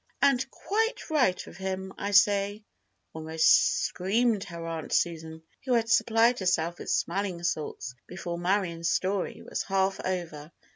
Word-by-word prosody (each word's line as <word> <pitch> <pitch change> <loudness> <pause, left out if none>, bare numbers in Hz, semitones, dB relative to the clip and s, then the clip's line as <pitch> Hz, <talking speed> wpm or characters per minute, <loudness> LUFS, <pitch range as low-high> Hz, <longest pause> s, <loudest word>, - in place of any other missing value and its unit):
"And 265 -2 +2
quite 450 -2 -2
right 250 -12 +2
of - - -12
him, 190 0 -4
I 200 - -4
say!" 205 +1 +3 0.5
almost 160 0 +3
screamed 210 +3 0
her 170 -2 -7
Aunt 165 -2 -5
Susan, 160 -1 -1 0.2
who 260 -1 0
had 230 -1 +1
supplied 230 +2 +3
herself 175 -2 0
with - - -7
smelling 180 -1 -1
salts 150 -6 -3
before 175 -2 -5
Marion's 175 -2 0
story 190 0 -1
was - - -3
half 195 0 0
over. 170 -5 -4
190 Hz, 140 wpm, -28 LUFS, 170-210 Hz, 0.5 s, say